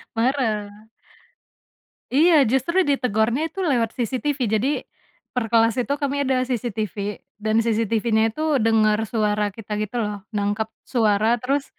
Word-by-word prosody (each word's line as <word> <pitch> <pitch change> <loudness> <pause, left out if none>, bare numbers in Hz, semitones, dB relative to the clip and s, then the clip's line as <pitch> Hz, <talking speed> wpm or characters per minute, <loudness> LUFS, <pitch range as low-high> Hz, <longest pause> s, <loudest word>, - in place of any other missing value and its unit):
Marah. 220 -4 -1 1.3
Iya 310 0 +5
justru 270 +10 +1
ditegornya 250 +2 +1
itu 325 - -16
lewat 240 -7 0
CCTV 260 +4 -1
jadi, 220 +5 +1 0.6
perkelas 230 -2 +2
itu 270 +3 -1
kami 285 0 -2
ada 260 -2 +1
CCTV, 215 -5 -3 0.2
dan 215 +1 0
CCTVnya 225 0 +1
itu 310 -3 +1
denger 220 -1 +3
suara 210 -2 0
kita 210 +1 -10
gitu 215 +3 -4
loh 205 -1 -4 0.2
nangkep 205 +2 -1 0.2
suara 220 -1 +2
terus, 275 +2 0
230 Hz, 120 wpm, -22 LUFS, 215-265 Hz, 1.3 s, Iya